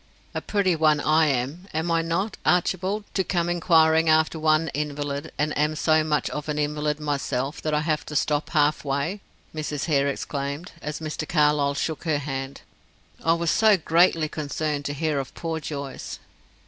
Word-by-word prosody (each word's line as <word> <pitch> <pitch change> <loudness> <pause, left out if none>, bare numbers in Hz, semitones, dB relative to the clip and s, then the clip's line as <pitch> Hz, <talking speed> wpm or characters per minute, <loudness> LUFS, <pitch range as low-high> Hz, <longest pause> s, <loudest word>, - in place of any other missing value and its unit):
"A - - -3
pretty 195 -4 +1
one, 155 -1 +3
I 155 +2 +3
am, 140 +7 -2
am 160 +2 0
I 165 0 +3
not, 170 +6 -1
Archibald, 185 +3 +1
to 190 - +1
come 175 -2 0
inquiring 160 -2 +4
after 160 +1 +3
one 155 0 +2
invalid, 145 0 -3
and 150 +1 0
am 150 +1 +1
so 155 0 +3
much 150 -1 0
of 150 +1 -5
an 150 - -1
invalid 150 0 -1
myself 140 -2 -2
that 155 -1 0
I 150 - +1
have 155 -1 0
to 150 - -6
stop 150 +1 +1
half 150 -2 +2
way?" 145 +8 -2 0.3
Mrs. 150 -2 -3
Hare 140 -4 +2
exclaimed, 140 +3 -4
as 150 +1 -5
Mr. 155 0 -4
Carlyle 150 -2 +3
shook 160 +3 -3
her 155 -3 +2
hand. 135 -1 -5 0.6
"I 165 - +4
was 170 0 0
so 215 -2 +5
greatly 165 -1 +3
concerned 150 -1 -3
to 145 - -2
hear 155 -1 0
of 135 - -6
poor 165 -1 -3
Joyce." 140 -3 -6
155 Hz, 175 wpm, -25 LUFS, 145-165 Hz, 0.6 s, so